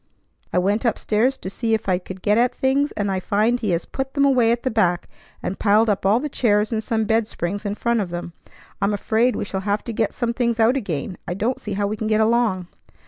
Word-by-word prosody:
I -, -, 0 dB
went 200 Hz, +4 st, +1 dB
up 235 Hz, -3 st, +1 dB
stairs 240 Hz, +5 st, +1 dB
to -, -, -8 dB
see 225 Hz, +2 st, 0 dB
if 220 Hz, -, -5 dB
I 180 Hz, -2 st, +2 dB
could 185 Hz, 0 st, -10 dB
get 210 Hz, -, +3 dB
at 240 Hz, +2 st, +2 dB
things, 275 Hz, +2 st, +1 dB
and 205 Hz, -2 st, -1 dB
I 190 Hz, -, 0 dB
find 215 Hz, +6 st, +1 dB
he 220 Hz, -3 st, -2 dB
has 170 Hz, -1 st, 0 dB
put 270 Hz, +1 st, -5 dB
them 280 Hz, -1 st, +4 dB
away 250 Hz, -4 st, +4 dB
at 235 Hz, 0 st, -1 dB
the 260 Hz, -, 0 dB
back, 180 Hz, -6 st, +1 dB, 0.4 s
and 195 Hz, -, -3 dB
piled 215 Hz, +1 st, +4 dB
all 205 Hz, +4 st, +4 dB
the 300 Hz, -, -3 dB
chairs 215 Hz, -6 st, +1 dB
and 220 Hz, -1 st, -1 dB
some 220 Hz, -1 st, 0 dB
bed 225 Hz, 0 st, +1 dB
springs 200 Hz, +2 st, -4 dB
in 205 Hz, -, -2 dB
front 235 Hz, 0 st, 0 dB
of 190 Hz, -, -3 dB
them. 175 Hz, 0 st, -6 dB, 0.5 s
I'm 205 Hz, +1 st, +2 dB
afraid 230 Hz, +4 st, +1 dB
we -, -, -2 dB
shall 190 Hz, -1 st, -3 dB
have 205 Hz, +1 st, -1 dB
to 235 Hz, -, -5 dB
get 220 Hz, -1 st, 0 dB
some 235 Hz, -1 st, -2 dB
things 235 Hz, -1 st, 0 dB
out 225 Hz, +3 st, +4 dB
again. 185 Hz, -, -3 dB
I 175 Hz, -, -2 dB
don't 230 Hz, +6 st, -1 dB
see 210 Hz, -, -4 dB
how 200 Hz, +1 st, 0 dB
we 210 Hz, +2 st, -2 dB
can 220 Hz, -, -3 dB
get 215 Hz, 0 st, +2 dB
along." 220 Hz, -4 st, +2 dB
215 Hz, 250 wpm, -22 LUFS, 200-235 Hz, 0.5 s, them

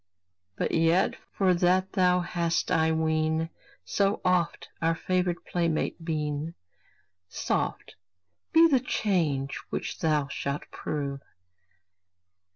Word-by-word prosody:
But -, -, -1 dB
yet, 165 Hz, +3 st, +3 dB, 0.2 s
for 190 Hz, -2 st, +3 dB
that 185 Hz, +2 st, +2 dB
thou 180 Hz, -1 st, +3 dB
hast, 170 Hz, 0 st, -1 dB
I 160 Hz, -2 st, +3 dB
ween, 160 Hz, 0 st, 0 dB, 0.3 s
So 200 Hz, 0 st, +1 dB
oft 180 Hz, -2 st, +1 dB
our 165 Hz, 0 st, +2 dB
favored 180 Hz, 0 st, -1 dB
playmate 170 Hz, -1 st, -1 dB
been, 155 Hz, 0 st, -2 dB, 0.7 s
Soft -, -, -2 dB, 0.6 s
be 330 Hz, +1 st, +7 dB
the 275 Hz, -5 st, +4 dB
change 165 Hz, -, 0 dB
which -, -, -4 dB
thou 150 Hz, -3 st, +1 dB
shalt 140 Hz, +1 st, -3 dB
prove! 140 Hz, -2 st, -4 dB
165 Hz, 105 wpm, -28 LUFS, 155-180 Hz, 0.7 s, be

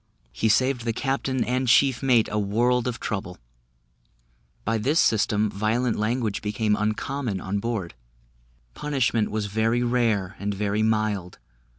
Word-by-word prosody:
He 110 Hz, -, 0 dB
saved 130 Hz, +2 st, +2 dB
the 115 Hz, -1 st, -1 dB
captain 135 Hz, 0 st, -1 dB
and 130 Hz, +1 st, -1 dB
chief 130 Hz, +1 st, +4 dB
mate 125 Hz, -4 st, +3 dB
a 105 Hz, -, 0 dB
world 120 Hz, +5 st, +1 dB
of 125 Hz, -, -3 dB
trouble; 95 Hz, -4 st, -4 dB, 1.3 s
by 115 Hz, +1 st, 0 dB
this 145 Hz, +9 st, +1 dB
system, 105 Hz, -1 st, +2 dB
violent 110 Hz, +4 st, 0 dB
language 110 Hz, -1 st, -1 dB
became 105 Hz, 0 st, 0 dB
uncommon 110 Hz, +1 st, -2 dB
on 95 Hz, +3 st, -2 dB
board, 105 Hz, -, -3 dB, 0.8 s
punishment 130 Hz, -, 0 dB
was 110 Hz, -1 st, -2 dB
very 110 Hz, +4 st, +1 dB
rare, 115 Hz, -6 st, 0 dB
and 100 Hz, 0 st, -2 dB
very 105 Hz, +1 st, -1 dB
mild. 110 Hz, -4 st, 0 dB
110 Hz, 135 wpm, -25 LUFS, 105-125 Hz, 1.3 s, chief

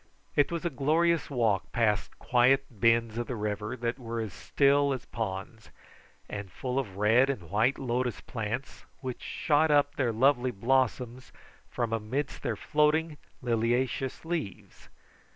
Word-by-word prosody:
It 145 Hz, +2 st, +3 dB
was 170 Hz, 0 st, -3 dB
a 170 Hz, -, 0 dB
glorious 160 Hz, +5 st, +2 dB
walk 115 Hz, -8 st, 0 dB
past 110 Hz, -3 st, 0 dB
quiet 130 Hz, +2 st, +3 dB
bends 115 Hz, +1 st, +2 dB
of 120 Hz, -, -3 dB
the 125 Hz, -, -3 dB
river 105 Hz, +2 st, -3 dB
that 120 Hz, +2 st, -2 dB
were 115 Hz, -1 st, -4 dB
as 110 Hz, -5 st, -4 dB
still 140 Hz, -, +2 dB
as 130 Hz, -, -6 dB
ponds, 105 Hz, 0 st, -5 dB, 0.6 s
and 100 Hz, -2 st, -6 dB
full 125 Hz, +10 st, -2 dB
of 100 Hz, -8 st, -5 dB
red 115 Hz, +6 st, +4 dB
and 90 Hz, -, -4 dB
white 110 Hz, +6 st, +2 dB
lotus 125 Hz, -2 st, -1 dB
plants 115 Hz, +3 st, -5 dB, 0.2 s
which 130 Hz, -2 st, -5 dB
shot 155 Hz, +1 st, +1 dB
up 145 Hz, -1 st, +3 dB
their 130 Hz, -5 st, 0 dB
lovely 130 Hz, +2 st, +3 dB
blossoms 125 Hz, +2 st, 0 dB, 0.4 s
from 115 Hz, -2 st, -2 dB
amidst 120 Hz, +6 st, -3 dB
their 115 Hz, -, -1 dB
floating 150 Hz, +5 st, +1 dB, 0.2 s
liliaceous 120 Hz, +4 st, 0 dB
leaves. 160 Hz, -, -5 dB
125 Hz, 145 wpm, -29 LUFS, 110-140 Hz, 0.6 s, red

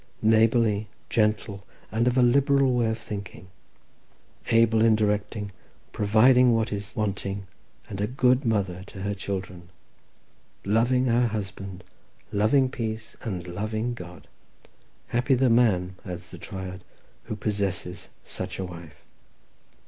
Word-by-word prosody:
"Neighbourly, 110 Hz, -1 st, +3 dB, 0.2 s
gentle, 105 Hz, -2 st, 0 dB, 0.3 s
and 115 Hz, +3 st, +1 dB
of 125 Hz, +1 st, +2 dB
a 125 Hz, -, +6 dB
liberal 140 Hz, +1 st, +4 dB
way 120 Hz, -2 st, +2 dB
of 110 Hz, -, -1 dB
thinking. 100 Hz, -4 st, -8 dB, 1.0 s
"Able 115 Hz, -1 st, +4 dB
in 115 Hz, -1 st, +5 dB
directing, 105 Hz, -1 st, -1 dB, 0.4 s
providing 120 Hz, +4 st, +5 dB
what 110 Hz, -2 st, 0 dB
is 100 Hz, +2 st, -6 dB
wanting, 100 Hz, -2 st, -2 dB, 0.4 s
and 100 Hz, -1 st, -5 dB
a 105 Hz, -, +1 dB
good 125 Hz, +1 st, +3 dB
mother 100 Hz, -6 st, 0 dB
to 95 Hz, -, -8 dB
her 100 Hz, 0 st, -1 dB
children. 95 Hz, -3 st, -5 dB, 1.0 s
"Loving 120 Hz, +5 st, +3 dB
her 120 Hz, 0 st, +3 dB
husband, 100 Hz, -3 st, -5 dB, 0.5 s
loving 110 Hz, +6 st, +3 dB
peace, 110 Hz, -2 st, -5 dB
and 90 Hz, -6 st, -4 dB
loving 110 Hz, +6 st, -2 dB
God. 90 Hz, -6 st, -10 dB, 0.8 s
"Happy 125 Hz, +3 st, +2 dB
the 130 Hz, -1 st, +3 dB
man," 100 Hz, -6 st, +3 dB
adds 90 Hz, -2 st, -7 dB
the -, -, -9 dB
Triad, 95 Hz, -1 st, -7 dB, 0.4 s
"who -, -, -4 dB
possesses 100 Hz, -4 st, -3 dB
such -, -, -5 dB
a 95 Hz, -, -3 dB
wife." 85 Hz, -4 st, -11 dB
110 Hz, 125 wpm, -26 LUFS, 100-115 Hz, 1.0 s, a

